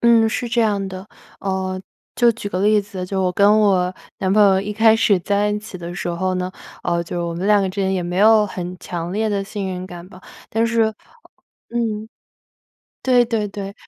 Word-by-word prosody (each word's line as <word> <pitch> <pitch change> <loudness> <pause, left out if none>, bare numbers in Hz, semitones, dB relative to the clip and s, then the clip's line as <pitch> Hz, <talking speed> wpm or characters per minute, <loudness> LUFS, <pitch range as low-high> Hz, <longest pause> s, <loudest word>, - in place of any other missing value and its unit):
嗯， 230 -1 +5
是 240 +2 -2
这 235 +1 +1
样 205 -3 +1
的。 190 +2 -8 0.3
呃， 190 -1 -2 0.4
就 240 -1 +5
举 215 -2 -6
个 185 -2 -2
例 210 +1 +4
子， 195 -3 -7
就 190 0 -1
我 180 - +2
跟 205 +3 +5
我 185 -3 +2 0.2
男 190 -1 0
朋 210 +1 +5
友 190 -1 +5
一 205 +2 -4
开 220 +1 +5
始 215 -3 +3
在 205 +3 +1
一 210 0 -1
起 205 -3 -9
的 175 0 -7
时 175 - -4
候 185 +2 -1
呢， 180 0 -2 0.3
呃， 170 -1 0
就 170 0 -3
我 - - -3
们 175 +3 -3
两 205 -1 +4
个 190 - 0
之 195 +2 -4
间 190 0 +1
也 185 - -1
没 175 +1 -4
有 215 +2 +6
很 180 -2 -6
强 175 0 -5
烈 215 +2 0
的 200 -1 -1
信 200 -1 -5
任 185 0 -5
感 175 -1 -10
吧， 185 -1 -14 0.3
但 225 +1 +1
是 230 -1 +2 0.8
嗯， 220 -2 -2 1.0
对 250 -2 +4
对 225 -3 -1
对。 200 0 -7
200 Hz, 230 characters per minute, -20 LUFS, 185-215 Hz, 1.0 s, 有